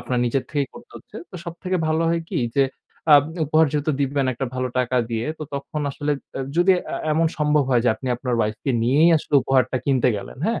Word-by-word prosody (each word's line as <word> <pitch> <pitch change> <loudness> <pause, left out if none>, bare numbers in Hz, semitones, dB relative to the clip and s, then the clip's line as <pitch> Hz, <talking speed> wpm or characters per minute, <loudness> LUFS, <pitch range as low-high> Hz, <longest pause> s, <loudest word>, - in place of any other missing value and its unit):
আপনার 125 -1 -2
নিজের 125 +2 0
থেকেই 140 -2 -1
করতে 240 - -14
হচ্ছে। - - -13
তো - - -16
সবথেকে 180 +2 -3
ভালো 160 +1 +1
হয় 170 0 +1
কী - - -2 0.2
যে 135 - +5 0.4
অ্যাব 145 -2 +8 0.2
উপহার 155 +2 +4
যেহেতু 150 +1 0
দিবেন 140 -1 0
একটা 130 +2 -3
ভালো 130 0 -1
টাকা 125 0 0
দিয়ে, 115 0 -2
তো - - -5
তখন 140 +2 -4
আসলে 145 +1 -2 0.4
যদি 175 +2 +4
এ - - -4 0.3
এমন 165 +1 +2
সম্ভব 150 -1 +2
হয় 120 -2 +4
যে - - +4
আপনি 130 +3 -6
আপনার 125 -1 -2
wife 110 0 -1
কে 135 - +1
নিয়েই 145 +8 +4
আসলে 150 - -4
উপহারটা 130 -1 +2
কিনতে 130 -3 +2
গেলেন, 100 +5 -8
হ্যাঁ? 230 - 0
140 Hz, 215 wpm, -22 LUFS, 125-155 Hz, 0.4 s, অ্যাব